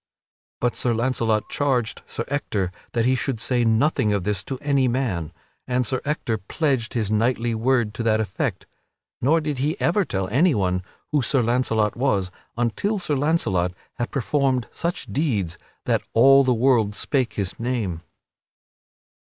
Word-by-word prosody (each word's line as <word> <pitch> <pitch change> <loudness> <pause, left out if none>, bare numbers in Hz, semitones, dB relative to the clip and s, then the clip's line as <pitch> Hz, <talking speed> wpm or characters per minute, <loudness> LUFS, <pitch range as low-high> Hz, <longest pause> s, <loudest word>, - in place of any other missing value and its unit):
But 120 -1 0
Sir 120 -2 +1
Launcelot 115 -3 0
charged 130 -6 0
Sir 115 - -4
Ector 105 -10 -1 0.2
that 115 -1 +1
he 130 - +4
should 130 -2 -1
say 120 +1 +1
nothing 115 0 +2
of 100 -3 0
this 100 -1 -1
to 135 - -4
any 140 -1 +1
man; 115 - -1 0.4
and 125 0 +1
Sir 130 +3 -1
Ector 130 -6 -1
pledged 125 - -1
his 110 -3 0
knightly 115 +2 +1
word 115 -1 +1
to 110 - -4
that 110 -1 +2
effect. 105 -4 -2 0.6
(Nor 160 +6 +3
did 150 -3 -3
he 155 +8 -1
ever 195 +4 +2
tell 95 - -2
anyone 105 - +2 0.3
who 150 -2 +3
Sir 130 0 +1
Launcelot 115 -3 +1
was 100 -8 0 0.3
until 120 - 0
Sir 175 -6 -1
Launcelot 130 - +1 0.3
had 120 - -1
performed 135 -2 0
such 170 +1 -3
deeds 105 - -1 0.3
that - - +2
all 135 +4 +7
the 130 - +2
world 115 -4 +3
spake 130 -1 0
his 100 -3 -4
name.) 115 -9 -2
120 Hz, 155 wpm, -23 LUFS, 110-135 Hz, 0.6 s, all